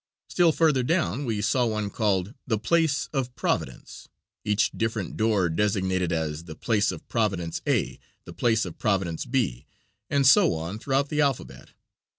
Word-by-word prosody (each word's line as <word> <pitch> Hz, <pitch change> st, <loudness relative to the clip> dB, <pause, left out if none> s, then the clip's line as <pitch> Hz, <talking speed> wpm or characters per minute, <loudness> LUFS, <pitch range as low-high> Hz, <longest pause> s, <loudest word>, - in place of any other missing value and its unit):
Still 175 Hz, -2 st, +4 dB
further 155 Hz, -4 st, +2 dB
down 145 Hz, 0 st, 0 dB
we 110 Hz, -4 st, -1 dB
saw 120 Hz, +3 st, +2 dB
one 105 Hz, -2 st, -2 dB
called 100 Hz, -2 st, 0 dB
"The 110 Hz, -3 st, +1 dB
place 155 Hz, +4 st, +1 dB
of 125 Hz, -3 st, -2 dB
Providence," -, -, -3 dB, 0.4 s
each 105 Hz, 0 st, +1 dB
different 110 Hz, -4 st, -3 dB
door 105 Hz, -5 st, +2 dB
designated 95 Hz, 0 st, 0 dB
as 80 Hz, -1 st, -2 dB
"The 80 Hz, -2 st, -9 dB
place 105 Hz, -1 st, +1 dB
of 85 Hz, -, -10 dB
Providence 95 Hz, -7 st, -1 dB
A, -, -, 0 dB, 0.3 s
the -, -, -10 dB
place 110 Hz, -3 st, +1 dB
of 85 Hz, -, -9 dB
Providence 95 Hz, -7 st, -1 dB
B," 105 Hz, -, -1 dB, 0.4 s
and 140 Hz, -2 st, +2 dB
so 125 Hz, -9 st, +6 dB
on 85 Hz, +6 st, -5 dB
throughout 135 Hz, +3 st, 0 dB
the 150 Hz, 0 st, +1 dB
alphabet. 140 Hz, -4 st, -2 dB
110 Hz, 160 wpm, -26 LUFS, 95-130 Hz, 0.4 s, so